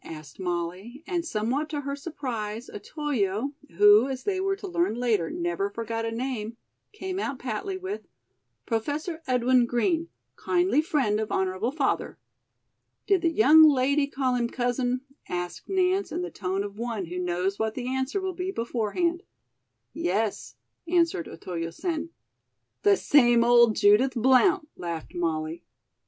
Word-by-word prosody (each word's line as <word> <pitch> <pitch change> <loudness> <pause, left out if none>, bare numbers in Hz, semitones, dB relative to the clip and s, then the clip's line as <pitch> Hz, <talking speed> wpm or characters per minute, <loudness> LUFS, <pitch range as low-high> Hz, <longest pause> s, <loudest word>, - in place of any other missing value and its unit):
asked 155 -2 -10
Molly; 185 - -4
and 350 -3 -1
somewhat 260 +3 -1
to 295 -1 -3
her 280 0 -3
surprise 245 -7 -5
Otoyo, 255 - -2 0.2
who, 205 +4 +7
as 265 -1 -5
they 385 -2 -1
were 390 +1 0
to 400 0 -8
learn 345 - 0
later, 230 -9 +1
never 175 +3 -2
forgot 225 +2 -4
a 225 - -2
name, 230 -2 -4 0.3
came 380 -3 -5
out 280 -9 -3
patly 260 - -4
with: 380 +3 -6 0.6
"Professor 295 +9 -2
Edwin 250 -1 +3
Green, 330 +8 0 0.3
kindly 350 -4 +2
friend 275 - 0
of 220 - -3
honorable 190 +5 0
father." 285 -2 -1 0.9
"Did 390 -3 +3
the 335 - +3
young 310 +2 +6
lady 280 +1 +2
call 265 -2 -1
him 240 -1 0
'Cousin'?" 245 0 -1 0.3
asked 175 -1 -5
Nance 380 +1 +1
in 350 +2 -2
the 360 - -5
tone 190 0 -2
of 205 +1 -8
one 230 -5 -3
who 180 +2 -5
knows 180 +2 -1
what 220 0 -1
the 250 -1 -4
answer 265 +7 -1
will 380 -1 -3
be 365 +1 -4
beforehand. 250 - -1 0.7
"Yes," 205 +4 -2 0.3
answered 335 - +1
Otoyo 165 0 -5
Sen. 325 - -3 0.7
"The 405 -1 +5
same 240 -5 +5
old 235 -2 +5
Judith 215 +7 +4
Blount," 265 - +4
laughed 170 -2 -6
Molly. 165 -1 -2
245 Hz, 145 wpm, -26 LUFS, 205-315 Hz, 0.9 s, who